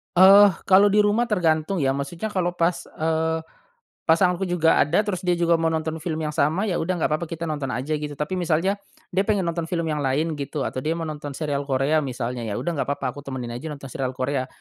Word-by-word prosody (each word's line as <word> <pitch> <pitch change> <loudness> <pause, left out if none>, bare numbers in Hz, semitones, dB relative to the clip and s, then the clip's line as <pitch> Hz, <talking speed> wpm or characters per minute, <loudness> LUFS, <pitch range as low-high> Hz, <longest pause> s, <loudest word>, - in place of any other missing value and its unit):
Eh, 195 +3 +9 0.2
kalo 195 +2 +6
di 210 +1 +4
rumah 215 +4 +2
tergantung 170 -4 +1
ya 140 -7 +1
maksudnya 165 +10 -4
kalo 175 -2 -1
pas, 170 0 0
eee, 160 0 -1 0.6
pasanganku 180 +3 +3
juga 170 -2 +3
ada 165 +8 +3
terus 200 -4 -2
dia 180 -1 +1
juga 170 -1 +2
mau 165 - +1
nonton 160 0 -2
film 160 0 -3
yang 150 - -2
sama, 155 +6 +1
ya 190 -6 -1
udah 180 +3 -1
nggak 160 - 0
papa 155 +2 -1
kita 165 0 -6
nonton 150 -4 -3
aja 130 +3 -4
gitu. 150 -1 -5
Tapi 150 +6 -3
misalnya 175 +4 +1 0.3
dia 190 +2 0
pengen 205 -3 +2
nonton 170 -1 -2
film 170 0 -1
yang 150 - -1
lain 145 +3 -1
gitu 140 0 -3
atau - - -3
dia 155 +5 -1
mau 165 - -4
nonton 150 -3 -6
serial 145 -2 -2
Korea 135 +3 +2
misalnya 125 -4 -4
ya 105 - -3
udah 175 - -2
nggak 160 - -2
apa-apa 140 -2 -2
aku 145 - -10
temenin 130 -4 -6
aja 120 +7 -6
nonton 140 -3 -8
serial 130 -1 -3
Korea. 130 0 -1
160 Hz, 225 wpm, -23 LUFS, 140-175 Hz, 0.6 s, Eh